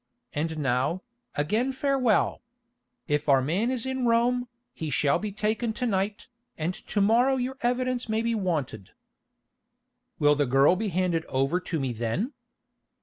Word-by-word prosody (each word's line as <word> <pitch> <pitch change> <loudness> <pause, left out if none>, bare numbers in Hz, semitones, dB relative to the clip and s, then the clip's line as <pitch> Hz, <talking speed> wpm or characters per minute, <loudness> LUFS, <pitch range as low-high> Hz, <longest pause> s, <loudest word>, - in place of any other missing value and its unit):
And 160 +2 -2
now, 135 +6 0 0.3
again 215 - +1
farewell. 260 -5 +1 0.7
If 150 -1 0
our 135 -1 +6
man 175 - 0
is 255 -2 -1
in 260 -2 -1
Rome, 245 +2 +2 0.3
he 160 - -5
shall 140 +1 +2
be 210 -1 -4
taken 215 +3 -1
to 250 +3 -2
night, 200 -1 -1 0.3
and 165 +3 -1
to 205 - -3
morrow 240 +6 +4
your 260 +1 -3
evidence 250 0 0
may 220 +1 0
be 230 0 0
wanted." 155 - -2 1.2
"Will 145 -1 +4
the 145 -1 +1
girl 135 +7 +5
be 215 +3 -2
handed 175 -2 0
over 135 +7 0
to 175 -3 -3
me 130 -3 -2
then?" 120 - -2
195 Hz, 150 wpm, -27 LUFS, 150-240 Hz, 1.2 s, our